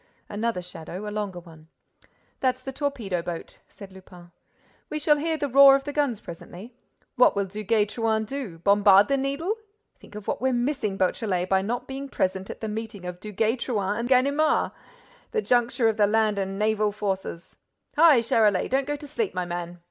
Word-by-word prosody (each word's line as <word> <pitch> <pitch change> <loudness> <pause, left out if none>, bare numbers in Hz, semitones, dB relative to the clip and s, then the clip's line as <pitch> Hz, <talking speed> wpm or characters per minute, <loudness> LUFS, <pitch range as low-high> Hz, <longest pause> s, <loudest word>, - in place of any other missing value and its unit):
Another 210 -3 -2
shadow, 180 +3 -7
a - - -4
longer 205 -4 -4
one. 160 -2 -16 0.7
"That's 255 -1 0
the 270 - -5
torpedo 260 - -2
boat," 170 -1 -7
said 200 -2 -12
Lupin. 180 -2 -15 0.6
"We 305 - -3
shall 300 0 +3
hear 320 +2 -1
the 290 -1 -1
roar 275 +1 +8
of 275 - -1
the 290 - -5
guns 285 -7 0
presently. 180 +7 -10 0.4
What 250 - +5
will 200 0 0
Duguay 210 +2 0
Trouin 220 0 -1
do? 240 -8 -6
Bombard 200 +2 +5
the 275 - +3
Needle? 280 +10 -2 0.4
Think - - -16
of 210 -1 -9
what - - -2
we're 260 0 +1
missing, 245 -5 -1
Beautrelet, 185 -1 0
by 190 0 +3
not 240 +5 -3
being 275 +1 -6
present 190 -4 -2
at - - -8
the 220 - -3
meeting 215 -3 -6
of 180 0 -6
Duguay 215 +4 -1
Trouin 205 -5 -1
and 240 +1 -3
Ganimard! 280 +4 +3 0.6
The 445 - +1
juncture 240 -1 +2
of 220 -1 +1
the 205 -1 +4
land 215 -1 +2
and 195 0 -3
naval 215 0 +1
forces! 195 -4 -4 0.4
Hi, 300 -5 +6
Charolais, 215 -4 +2
don't 270 +1 0
go 290 - -1
to 295 +1 -10
sleep, 390 - -3
my 180 - -1
man!" 175 0 -5
215 Hz, 185 wpm, -25 LUFS, 195-265 Hz, 0.7 s, roar